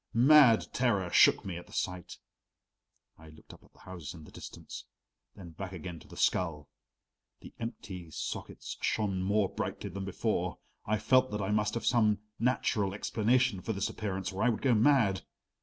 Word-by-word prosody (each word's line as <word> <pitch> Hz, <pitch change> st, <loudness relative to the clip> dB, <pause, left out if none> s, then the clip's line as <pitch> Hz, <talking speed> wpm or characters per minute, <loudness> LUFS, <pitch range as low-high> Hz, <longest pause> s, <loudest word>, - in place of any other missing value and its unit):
Mad 125 Hz, -2 st, +7 dB
terror 100 Hz, -8 st, +1 dB
shook -, -, +5 dB
me 90 Hz, -3 st, -4 dB
at 90 Hz, -, -10 dB
the -, -, -16 dB
sight. 90 Hz, -2 st, -4 dB, 1.0 s
I 80 Hz, 0 st, -13 dB
looked 80 Hz, 0 st, -15 dB
up -, -, -17 dB
at -, -, -23 dB
the -, -, -22 dB
houses 85 Hz, -4 st, -8 dB
in 80 Hz, -, -11 dB
the -, -, -14 dB
distance, -, -, -9 dB, 0.5 s
then 90 Hz, -4 st, -10 dB
back 95 Hz, +3 st, -7 dB
again 85 Hz, -1 st, -7 dB
to -, -, -17 dB
the -, -, -13 dB
skull; 80 Hz, -5 st, 0 dB, 0.7 s
the -, -, -12 dB
empty 95 Hz, -7 st, -7 dB
sockets -, -, -6 dB
shone 100 Hz, -4 st, 0 dB
more 100 Hz, +1 st, +2 dB
brightly 100 Hz, -, -4 dB
than 100 Hz, +2 st, -5 dB
before. 95 Hz, -, -2 dB, 0.3 s
I 110 Hz, +1 st, +2 dB
felt 130 Hz, +4 st, +3 dB
that 105 Hz, 0 st, -3 dB
I 95 Hz, -, -1 dB
must 105 Hz, 0 st, +1 dB
have 115 Hz, -, -3 dB
some 110 Hz, -4 st, +3 dB, 0.2 s
natural 110 Hz, -5 st, 0 dB
explanation 115 Hz, 0 st, +1 dB
for 110 Hz, -, -3 dB
this 100 Hz, -1 st, -1 dB
appearance 95 Hz, -3 st, -4 dB
or 95 Hz, -, -4 dB
I 125 Hz, -, +4 dB
would 115 Hz, -, -2 dB
go 130 Hz, -3 st, +4 dB
mad. 110 Hz, -, +3 dB
100 Hz, 180 wpm, -31 LUFS, 90-115 Hz, 1.0 s, Mad